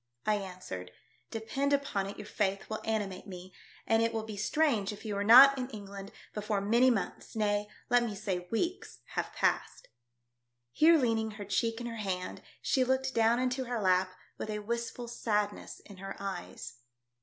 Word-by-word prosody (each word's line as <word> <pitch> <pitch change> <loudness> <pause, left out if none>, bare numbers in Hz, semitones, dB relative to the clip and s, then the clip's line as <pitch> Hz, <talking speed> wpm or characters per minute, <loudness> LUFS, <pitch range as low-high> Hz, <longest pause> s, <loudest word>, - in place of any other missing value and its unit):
I 210 -1 +3
answered, 180 - -7 0.2
" - - -38
Depend 275 +6 -1
upon 275 -9 0
it 200 - -7
your 210 - -7
faith 195 -2 -1
will 215 - -3
animate 205 -4 -2
me, 185 -1 -9 0.3
and 225 0 +3
it 230 0 +2
will 220 - -1
be 220 -1 -7
strange 220 -1 +1
if 210 +2 -10
you 210 -2 -2
are 200 - 0
not 265 +5 +9
in 250 0 -3
England 200 -3 -8 0.2
before 210 -1 -1
many 235 +6 +4
months, 230 -1 -2
nay, 205 -1 +1 0.2
let 245 -1 +4
me 230 -4 -2
say 185 -3 -3
weeks, 340 +11 -2
have - - -3
passed." - - -1 0.8
Here 325 - +6
leaning 225 -5 +1
her 205 - -6
cheek 225 +4 0
in 240 - -5
her 230 -1 -5
hand 190 -3 -3 0.2
she 260 - +3
looked 260 +1 0
down 230 0 +4
into 255 +1 0
her 240 -1 -2
lap 185 -1 +2 0.2
with - - -4
a 210 - -2
wistful 235 +1 -3
sadness 210 -3 -2
in 200 - -12
her 195 +1 -6
eyes. 195 -10 -6
215 Hz, 180 wpm, -31 LUFS, 200-240 Hz, 0.8 s, not